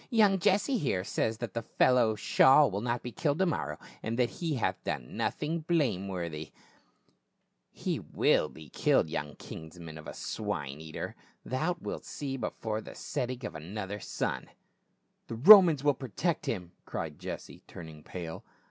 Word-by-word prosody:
" - - -31
Young 210 -5 +4
Jesse, 210 +8 +2
here, 95 - 0
says 110 +3 -1
that 120 0 -5
the 115 - -2
fellow 115 -1 +3
Shaul 135 +5 +5
will 100 +2 -2
not 120 0 -1
be 125 - -5
killed 145 +3 0
to 190 - +3
morrow, 75 - -2 0.2
and 115 +1 -3
that 125 -1 +2
he 165 -4 0
hath 120 - -1
done - - -4
nothing 160 +3 -1
blameworthy 95 - -1 0.4
!" - - -41
" - - -49
He - - +1
will 75 - +2
be 80 -1 -12
killed, 80 - +2
young 75 -3 -3
kinsman 80 -1 -9
of 75 - -11
a - - -7
swine 80 -9 -4
eater; 80 -1 -6 0.3
thou 160 +8 -1
wilt - - -5
see 140 -2 -4
before 110 -2 -3
the - - -10
setting 125 -1 -3
of - - -5
another 95 +5 -5
sun." - - -3 0.8
"The 115 - -5
Romans 165 - +9
will 145 -1 +4
protect 140 - -2
him 90 -6 -3
!" - - -43
cried - - -5
Jesse, - - -7
turn 85 - -9
ing 75 -1 -12
pale. 85 0 -7
115 Hz, 175 wpm, -30 LUFS, -, 0.8 s, Romans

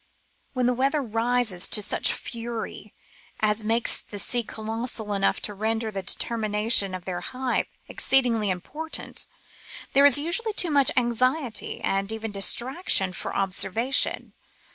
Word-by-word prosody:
When 255 -2 0
the 250 - +3
weather 275 +4 0
rises 230 -4 +2
to 210 - +1
such - - +3
fury 230 -3 -6 0.5
as 215 0 +1
makes 225 +2 +2
the 205 - -9
seas 240 +3 0
colossal 220 -1 -3
enough 195 -1 +1
to 210 - -3
render 220 +2 -2
the 195 -2 -4
determination 210 -1 +1
of 180 -1 -9
their 180 -2 -4
height 255 +6 -2 0.2
exceedingly 235 -6 +2
important, 300 - -5 0.7
there 280 +1 +7
is 285 - +6
usually 345 +9 -1
too 355 -5 +1
much 280 -3 +4
anxiety, 250 0 0
and 195 +1 -1
even 220 0 -5
distraction, 205 - +1
for - - -5
observation. 210 +6 0
225 Hz, 135 wpm, -25 LUFS, 210-255 Hz, 0.7 s, there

